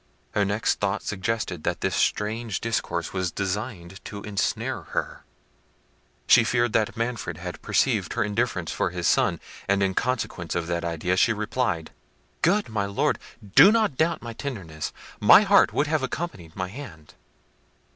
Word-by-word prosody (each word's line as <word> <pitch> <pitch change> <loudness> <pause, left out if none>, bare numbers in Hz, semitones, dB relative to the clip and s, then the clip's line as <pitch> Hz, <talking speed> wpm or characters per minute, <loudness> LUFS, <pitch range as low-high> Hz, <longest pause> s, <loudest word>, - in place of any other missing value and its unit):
Her 105 - +1
next 100 +2 0
thought 100 +1 -1
suggested 95 -4 -2
that - - -2
this - - 0
strange 110 0 0
discourse 85 -7 -2
was 95 -2 -1
designed 100 -2 -4
to 100 -1 -7
ensnare 105 -1 -2
her: - - -4 1.0
she 120 - +7
feared 120 -1 +1
that 110 -1 +1
Manfred 115 -8 -3
had 90 +1 -7
perceived - - +1
her 120 - +1
indifference 105 -5 -1
for - - 0
his - - -2
son: - - +2 0.3
and 100 0 +2
in 95 -1 +1
consequence 115 -8 -2
of 85 -1 -1
that 85 0 -2
idea 85 +2 -1
she 115 - +4
replied— 105 -5 -2 0.5
"Good 200 +5 +3
my 105 -3 -2
Lord, 100 - 0 0.4
do 200 - +9
not 220 -10 +2
doubt 160 +1 0
my 115 0 -6
tenderness: 95 - -5 0.3
my 105 - +8
heart 200 0 +5
would 145 - +1
have 155 -1 0
accompanied 130 - -5
my 95 -1 -3
hand. 95 - -10
105 Hz, 155 wpm, -25 LUFS, 90-120 Hz, 1.0 s, do